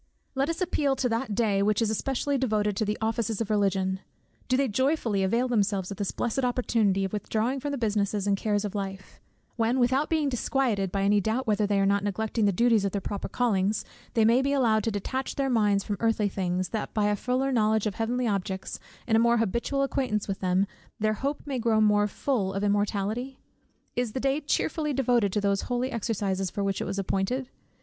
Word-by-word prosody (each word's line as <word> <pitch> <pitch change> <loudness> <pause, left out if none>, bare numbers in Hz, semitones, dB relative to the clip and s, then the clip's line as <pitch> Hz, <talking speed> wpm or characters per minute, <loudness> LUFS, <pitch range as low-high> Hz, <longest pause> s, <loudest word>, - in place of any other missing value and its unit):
Let 275 +2 0
us 335 +2 -3
appeal 295 -6 +1
to 260 - 0
that 230 -1 -1
Day 210 -3 +2
which 210 +1 +2
is 225 -2 +1
especially 270 +5 -1
devoted 215 -6 0
to 215 - 0
the 210 +1 -1
offices 225 -1 -1
of 225 -2 -2
Religion: 190 -2 +1 0.5
Do 255 - +2
they 275 0 +2
joyfully 250 -3 +1
avail 230 +7 +1
themselves 200 -5 0
of 195 - -6
this 200 - -2
blessed 245 +3 -2
opportunity 225 -6 +1
of 190 - -5
withdrawing 225 +5 -1
from 290 - -3
the 285 - -2
business 210 -3 0
and 200 -1 +2
cares 205 0 0
of 205 - -4
life; 195 -2 -6 0.4
when, 230 +2 +1
without 260 +4 +2
being 315 -3 +1
disquieted 245 -6 0
by 195 0 0
any 205 +1 +3
doubt 225 +6 -1
whether 210 -2 +1
they 200 -1 +1
are 195 - +3
not 200 0 +2
neglecting 220 +2 -1
the 200 - +4
duties 225 +2 +3
of 200 - -1
their 200 - 0
proper 200 +1 -4
callings, 210 -4 0 0.3
they 225 -2 +4
may 235 +3 +5
be 280 +1 0
allowed 225 -6 +3
to 225 - +1
detach 260 +6 -3
their 270 -1 0
minds 205 -4 +2
from 205 - -3
earthly 225 -2 +2
things, 185 -1 -2
that 220 - -3
by 210 -1 +2
a 210 0 +2
fuller 255 +5 0
knowledge 220 -3 +2
of 210 - -1
heavenly 240 +4 -1
objects, 190 -2 -3 0.3
and 225 - +2
a - - +5
more 235 +1 +4
habitual 235 +6 0
acquaintance 255 -6 -1
with 195 -1 -3
them, 185 +1 +2 0.3
their 215 0 +2
hope 280 +6 -3
may 275 -3 -2
grow 225 -2 +2
more 210 -1 +4
"full 205 -4 -1
of 195 - -2
immortality?" 205 +5 -1 0.6
Is 245 -3 -1
the - - -2
day 275 +2 +1
cheerfully 300 +1 -1
devoted 245 -6 +2
to 210 - +1
those 200 -1 +1
holy 245 +1 -1
exercises 200 -4 -1
for 200 - -3
which 195 -1 -1
it - - -2
was 195 - -3
appointed? 195 +7 -1
220 Hz, 215 wpm, -27 LUFS, 200-250 Hz, 0.6 s, may